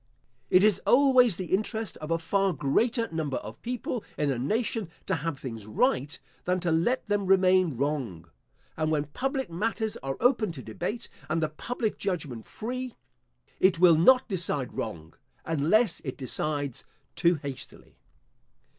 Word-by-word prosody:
It 185 +1 +6
is 210 -3 +4
always 250 -6 +5
the 185 -2 -4
interest 220 +1 -1
of 155 - -7
a 165 - +2
far 195 +3 +1
greater 225 - +1
number 155 -5 -2
of 110 +2 -8
people 245 -1 -3
in 145 -2 +1
a 125 - -2
nation 220 - -1 0.2
to - - 0
have 150 0 -3
things 115 -6 -7
right, 145 - +1 0.3
than 180 +1 +1
to 170 -2 0
let 170 +11 +1
them 205 -2 0
remain 185 -6 +4
wrong; 130 - -2 0.5
and 155 -1 0
when 150 -2 +1
public 265 - -3
matters 220 +4 -1
are 135 0 -4
open 235 -5 +3
to 130 -5 -9
debate, 210 - -4 0.2
and - - +1
the 155 -1 0
public 220 +7 -3
judgment 145 - -3
free, 250 +2 -5 0.6
it 190 -2 +4
will 170 -1 +7
not 255 +11 +5
decide 170 - -2
wrong, 80 -7 -5 0.3
unless 165 +7 +2
it 130 - -5
decides 145 0 -2 0.3
too 170 +1 +3
hastily. 140 -3 -8
170 Hz, 155 wpm, -28 LUFS, 145-220 Hz, 0.6 s, will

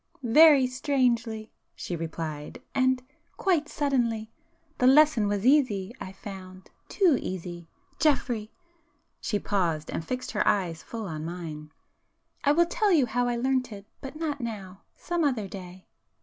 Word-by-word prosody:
"Very 285 +3 +7
strangely!" 245 -4 0 0.2
she 175 - -4
replied—"And—quite 260 - -2
suddenly! 235 -6 0 0.5
The 250 - +4
lesson 275 -5 +5
was 205 +1 -1
easy, 240 -8 +3
I 185 - -6
found;—too 195 - -2
easy! 175 -2 -6 0.3
Geoffrey,"—she 280 -1 -3
paused, 170 -6 -1
and - - -3
fixed 255 +8 -4
her - - 0
eyes 180 -6 +1
full 225 -2 -6
on 155 -4 -5
mine—"I 160 - -6
will 340 +3 +4
tell 410 +4 +1
you 305 -7 +5
how 245 +1 0
I 240 - 0
learnt 255 0 0
it,... 200 -1 -9 0.2
but 270 +1 -8
not 305 -3 -3
now,... 200 -5 -6
some 345 -1 -2
other 250 -9 0
day." 185 -1 -10
230 Hz, 125 wpm, -27 LUFS, 190-280 Hz, 0.5 s, Very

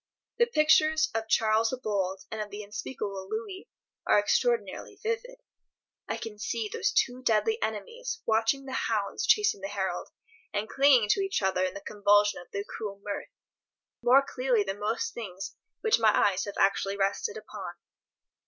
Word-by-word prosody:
The 475 - +5
pictures 315 -4 +4
of 225 0 -2
Charles 220 +1 +3
the 255 - -3
Bold 195 -5 -2
and 220 - -3
of 210 - -5
the 205 +1 -7
unspeakable 200 -2 -5
Louis 420 -4 -5 0.4
are - - +5
extraordinarily 485 -1 0
vivid. 470 +3 -4 0.7
I - - -1
can 215 -2 -8
see 225 0 -2
those - - +1
two 250 +1 +1
deadly 255 - +2
enemies 475 -2 -4
watching 225 +5 +1
the 265 - -7
hounds 220 - -1
chasing 420 - +3
the 195 - -3
herald, 195 -2 -3 0.4
and 210 +1 -1
clinging 270 -5 +5
to 395 - +3
each 390 - -1
other 190 -1 +2
in 185 - -1
the 200 - -6
convulsion 205 -1 +3
of - - -15
their 200 - -3
cruel 205 -1 -6
mirth, 205 -1 -5 0.7
more 265 +3 +5
clearly 250 -4 +1
than 195 +1 -4
most 215 +3 -1
things 195 -5 -7 0.3
which 440 - +3
my 220 -1 +5 0.2
eyes 190 0 -2
have 205 - -7
actually 195 0 +2
rested 200 - -1
upon. - - -8
220 Hz, 165 wpm, -28 LUFS, 200-310 Hz, 0.7 s, The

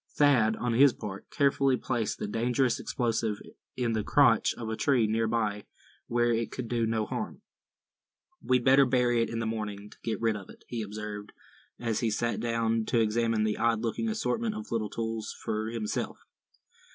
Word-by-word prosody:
Thad, 125 -7 +4
on 120 -1 -1
his 135 +2 +6
part, 95 -2 -7
carefully 135 -2 +2
placed 120 -4 -2
the - - -3
dangerous 120 +3 +1
explosive 115 -3 -1 0.4
in 120 -2 0
the 110 -2 0
crotch 135 -2 +4
of 115 - -6
a 110 - -2
tree 125 -1 +3
near 110 +1 +1
by, 105 -3 -1 0.4
where 120 0 +2
it 115 0 -1
could 125 -2 -5
do 115 -1 0
no 110 -1 0
harm. 215 - -5 1.0
"We'd 125 -1 +1
better 135 +1 +6
bury 120 -2 +3
it 115 - 0
in 115 - -4
the 115 - -1
morning, 105 -2 -4
to - - -15
get 115 - -2
rid 115 -1 +1
of 100 -3 -8
it," - - -14
he 120 -2 -3
observed, 105 0 -6 0.5
as 115 -3 -1
he 115 - +1
sat 115 +2 -1
down 115 -1 0
to 120 - +1
examine 115 0 +2
the 110 -1 0
odd 115 -2 +2
looking 120 - -1
assortment 220 0 -1
of 220 +1 -7
little 110 -2 -1
tools, 115 0 -4
for 110 0 -2
himself. 115 -2 -3
115 Hz, 185 wpm, -29 LUFS, 110-120 Hz, 1.0 s, his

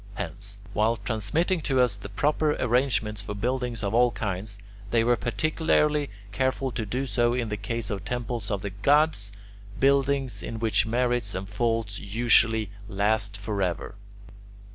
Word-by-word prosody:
Hence, 100 +1 -5 0.2
while 110 +2 +2
transmitting 160 - -1
to 135 -3 +1
us 125 -5 +3
the 100 0 -9
proper 150 +8 +1
arrangements 115 -5 +1
for 105 - -6
buildings 120 0 -2
of 100 +1 -1
all 120 +1 +5
kinds, 100 -2 -4 0.3
they 115 +1 +3
were 120 +1 +4
particularly 150 +3 +1 0.2
careful 130 +3 0
to 115 -3 -3
do 125 +6 -1
so 120 0 +1
in 120 -3 -1
the 105 - -1
case 110 +2 -3
of 100 -2 -3
temples 120 -1 -3
of 100 -1 -2
the 100 - -3
gods, 105 +1 +2 0.5
buildings 135 -4 +2
in 115 - -5
which 110 0 +2
merits 120 -1 0
and 95 +1 -4
faults 110 -1 -1
usually 110 0 +3 0.2
last 100 0 0
forever. 100 -3 -2
115 Hz, 150 wpm, -26 LUFS, 100-125 Hz, 0.5 s, all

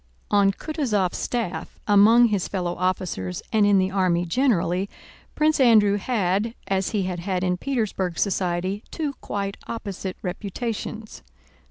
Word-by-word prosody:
On 200 -1 +5
Kutúzov's 215 - -1
staff, 230 -7 -3
among 225 +4 +6
his 200 -4 0
fellow 180 -3 -2
officers 180 - -2
and 210 -2 +4
in 205 -1 +5
the 190 0 +1
army 180 -3 +1
generally, 190 -3 +1 0.5
Prince 305 0 +2
Andrew 215 -5 +5
had, 205 0 0
as 195 -1 0
he 210 -3 0
had 180 -1 -3
had 185 0 -2
in 180 -1 +1
Petersburg 195 -6 -2
society, 185 +1 -1
two 300 -4 -3
quite 200 -1 -3
opposite 200 -4 -5
reputations. 215 +3 -5
200 Hz, 135 wpm, -24 LUFS, 185-225 Hz, 0.5 s, among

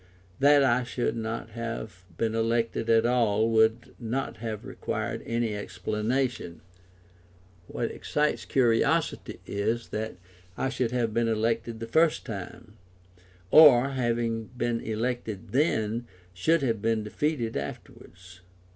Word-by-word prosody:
That 145 +1 +6
I 125 -1 +3
should 120 0 -2
not 115 0 -4
have 110 -5 -6
been 110 -1 0
elected 115 0 0
at 115 0 +4
all 115 -2 +2
would 110 +1 +2
not 120 -1 -3
have 110 -1 -5
required - - -4
any 115 -2 -1
explanation; 110 -1 -2 1.1
what - - -3
excites 150 0 -1
curiosity 135 +6 +1
is 110 +4 -2
that 110 +1 -4 0.4
I 130 - 0
should 125 -2 -1
have 120 -2 -1
been 115 0 +1
elected 115 +1 -1
the 115 - -4
first 160 +7 +2
time, 105 +1 -8 0.7
or, 140 -4 +8
having 115 -3 -1
been 120 -1 0
elected 110 -2 -3
then, 120 -5 0 0.3
should 155 - +2
have 115 -5 0
been 110 -1 +1
defeated 120 +1 -2
afterwards. 90 0 -8
115 Hz, 120 wpm, -27 LUFS, 110-125 Hz, 1.1 s, or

